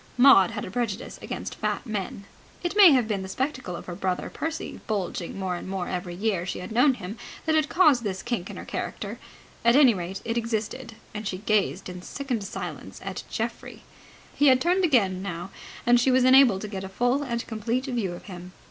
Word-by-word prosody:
Maud 245 -8 +7
had - - -5
a - - -8
prejudice 230 -1 -3
against - - -5
fat - - -2
men. 200 -3 -4 0.4
It 350 +3 -2
may 400 -5 +9
have 250 -5 +3
been 205 -3 -1
the 190 - -6
spectacle 260 - -3
of - - -8
her 180 - -6
brother 185 0 -2
Percy, 320 0 -4
bulging 190 -4 -3
more 190 -2 -2
and 175 - -7
more 190 -2 -3
every 180 -1 -4
year 195 -2 0
she 180 - -4
had 180 - -7
known 250 +4 +4
him, 205 +1 -7 0.3
that 320 - +2
had 310 -1 +2
caused 305 -8 +5
this 190 -4 -3
kink 240 -7 -3
in - - -8
her - - -7
character. - - -5 0.4
At 235 +1 +5
any 270 -4 +7
rate, 185 0 -5
it 230 +1 0
existed, 230 +1 -4 0.2
and 210 0 -4
she 185 - -3
gazed 205 -1 0
in 180 -1 -7
sickened 250 +1 -3
silence - - -6
at - - -5
Geoffrey. - - -5 0.5
He 290 - +3
had 260 -1 +6
turned 360 +5 +2
again 200 - +3
now, 180 -1 -5 0.3
and 240 0 +5
she 245 - +3
was 255 0 +4
enabled 255 -6 +6
to 210 - -4
get 195 -2 -5
a 190 - -6
full 245 +7 +1
and 235 -4 -3
complete 230 +3 -2
view 235 -9 -2
of 175 - -9
him. 180 -1 -9
220 Hz, 210 wpm, -26 LUFS, 190-255 Hz, 0.5 s, may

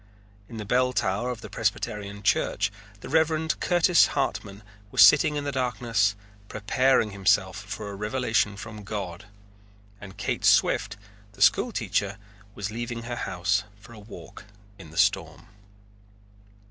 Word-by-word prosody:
In 115 - -8
the 105 - -5
bell 125 +3 +1
tower 105 +3 -1
of 125 -3 -5
the - - -9
Presbyterian 100 -1 -3
Church 100 -1 +1 0.3
the - - -8
Reverend 160 +1 +1
Curtis 175 0 +4
Hartman 105 -7 -3 0.3
was - - +7
sitting 155 0 +5
in 145 - -2
the 145 - -2
darkness 115 -5 0 0.3
preparing 115 +2 +1
himself 95 -1 +1
for 105 +1 -7
a - - -7
revelation 105 -1 0
from 105 0 -9
God, 95 -2 -6 0.8
and 95 -1 -11
Kate - - -3
Swift, 100 +1 +3 0.4
the 100 - -14
school 105 - +4
teacher, 100 - -2 0.4
was 100 0 -4
leaving 120 +1 -5
her 120 +1 -5
house 95 0 -1 0.2
for 115 +3 -15
a 110 - -12
walk 105 -1 -12 0.3
in 85 -5 -11
the 80 - -13
storm. - - +1
105 Hz, 145 wpm, -26 LUFS, 100-125 Hz, 0.8 s, was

